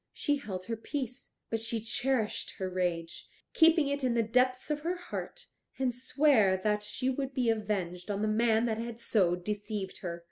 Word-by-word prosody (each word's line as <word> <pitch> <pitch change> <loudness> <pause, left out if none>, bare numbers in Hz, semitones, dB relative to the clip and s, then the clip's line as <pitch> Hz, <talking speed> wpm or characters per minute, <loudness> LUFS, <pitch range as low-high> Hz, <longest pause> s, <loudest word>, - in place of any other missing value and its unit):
She 290 -1 +1
held 190 -9 -6
her 230 - -2
peace, 255 +2 -5 0.2
but 225 - 0
she 225 0 -1
cherished 230 0 -1
her 190 - -2
rage, 175 -3 -2 0.2
keeping 325 -2 +5
it 280 0 -2
in 250 -2 +2
the 230 - +3
depths 255 +5 +1
of 295 - 0
her 340 +4 -1
heart, 365 +7 -6 0.3
and 260 -2 +1
sware 250 -6 +3
that 210 -1 +2
she 230 +4 -3
would 270 0 -3
be 245 -3 +3
avenged 200 -5 -2
on 205 +1 -1
the - - +2
man 225 +1 +3
that 225 -2 -1
had 235 0 -5
so 185 -7 +2
deceived 205 +1 -4
her. 170 -2 -4
225 Hz, 185 wpm, -31 LUFS, 205-260 Hz, 0.3 s, keeping